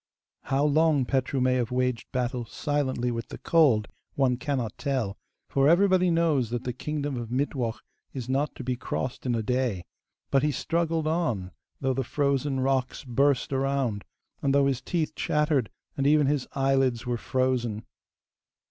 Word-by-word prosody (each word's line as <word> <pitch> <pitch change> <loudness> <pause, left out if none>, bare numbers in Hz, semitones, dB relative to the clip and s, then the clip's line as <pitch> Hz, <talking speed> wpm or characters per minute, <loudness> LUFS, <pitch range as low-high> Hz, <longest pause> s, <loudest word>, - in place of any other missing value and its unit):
How 135 +2 +1
long 150 -2 +3
Petru 135 +1 0
may 130 0 +3
have 125 -2 0
waged 125 -1 -1
battle 125 -1 -1
silently 130 -1 -1
with 115 -1 -4
the - - -8
cold 135 -11 +3 0.3
one 130 -3 +2
cannot 130 -4 -2
tell, 130 -9 -1 0.3
for 140 +1 +3
everybody 185 +1 +4
knows 160 -8 +2
that 120 +1 -3
the 125 - -3
kingdom 145 +1 -3
of 120 -2 -5
Mittwoch 125 -3 -1 0.3
is 125 -3 -6
not 140 +3 0
to - - -7
be 125 0 -1
crossed 125 +1 -4
in 120 - +1
a 115 - -1
day, 125 -7 -1 0.5
but 135 - +4
he 150 - +2
struggled 165 +1 0
on, 155 - -1 0.3
though 135 -1 +1
the 135 +1 -1
frozen 140 0 0
rocks 130 -1 0
burst 135 +2 +1
around, 135 -6 0 0.4
and 140 -1 +2
though 140 -1 +5
his 135 -2 0
teeth 160 +3 -1
chattered, 150 -6 +1 0.3
and 140 0 +1
even 150 0 +5
his 140 -1 0
eyelids 135 -3 +2
were 120 -1 0
frozen. 120 -3 -1
135 Hz, 165 wpm, -27 LUFS, 125-145 Hz, 0.5 s, though